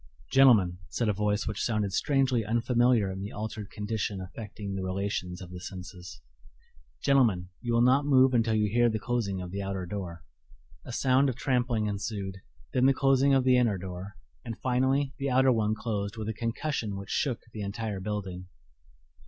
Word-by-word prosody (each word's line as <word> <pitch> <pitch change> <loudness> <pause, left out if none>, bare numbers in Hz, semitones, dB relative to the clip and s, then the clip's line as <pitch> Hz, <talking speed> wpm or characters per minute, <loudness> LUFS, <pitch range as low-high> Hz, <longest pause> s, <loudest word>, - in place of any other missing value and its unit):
"Gentlemen," 105 -10 +5
said 115 -3 0
a - - +2
voice 105 +1 0
which 105 - -3
sounded 105 -4 0
strangely 135 -4 +2
unfamiliar 115 -1 +2
in 95 0 -6
the 100 - -5
altered 105 -1 -5
condition 105 -2 -3
affecting 100 +1 -7
the 95 - -3
relations 95 -1 -3
of 90 - -11
the 90 - -7
senses 90 -1 -9 0.8
"gentlemen, 115 -11 +3
you 120 -1 -2
will 120 - +4
not 130 +3 +4
move 130 -2 +5
until 115 -2 +2
you 105 -1 +2
hear 120 +1 +4
the 110 - -1
closing 105 -5 -2
of 90 - -7
the 100 +1 -3
outer 95 -1 -3
door." 90 -4 -6 0.6
A - - -7
sound 130 +2 +3
of 125 - -3
trampling 125 -4 0
ensued, 100 -2 -4 0.3
then 130 +1 +4
the 135 - +4
closing 135 0 +4
of 135 - +3
the 130 -1 +5
inner 115 -5 +2
door; 95 +2 -7 0.3
and 115 - -6
finally 130 +2 +1
the 140 0 -1
outer 130 +1 +4
one 110 -2 +1
closed 105 -2 -3
with 110 -1 -4
a 110 - -1
concussion 115 -1 -2
which 100 0 -7
shook 130 -6 0
the 110 - -5
entire 105 0 -3
building. 95 -3 -4
110 Hz, 180 wpm, -28 LUFS, 100-125 Hz, 0.8 s, Gentlemen